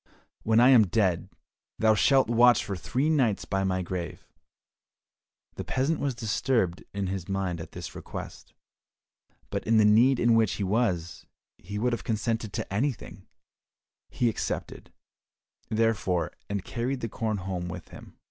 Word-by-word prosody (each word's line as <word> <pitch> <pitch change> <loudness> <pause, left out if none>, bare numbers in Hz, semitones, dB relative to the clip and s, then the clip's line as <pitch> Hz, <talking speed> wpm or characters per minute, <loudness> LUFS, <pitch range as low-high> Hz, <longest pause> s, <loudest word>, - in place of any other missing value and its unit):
"When 110 +1 +3
I 125 +2 +7
am 115 -6 +6
dead, 95 -4 0 0.5
thou 110 -1 +4
shalt 135 +5 +4
watch 120 +1 +5
for 100 - -3
three 105 - -1
nights 130 -10 +1
by 95 0 -1
my 95 -1 0
grave." 90 -1 -5 1.3
The - - -3
peasant 145 +5 0
was 140 -3 -1
disturbed 110 -4 0
in 100 0 -3
his 95 -1 -4
mind 95 -3 -2
at - - -10
this - - -7
request, - - -9 1.0
but - - -2
in 115 0 +4
the 110 - +5
need 120 +5 +5
in 120 0 +4
which 115 -3 +3
he 100 - -3
was, 95 -5 -1 0.3
he 100 +3 -7
would 120 +3 0
have 120 - -3
consented 110 -1 -2
to 110 -1 -4
anything; 125 +4 -3 0.8
he 120 - 0
accepted, 115 - -4 0.8
therefore, 110 -6 0 0.2
and 100 -2 -3
carried 125 +2 -3
the 115 - -2
corn 110 -1 -2
home 90 -2 -4
with 90 - -8
him. - - -13
110 Hz, 155 wpm, -27 LUFS, 95-120 Hz, 1.3 s, I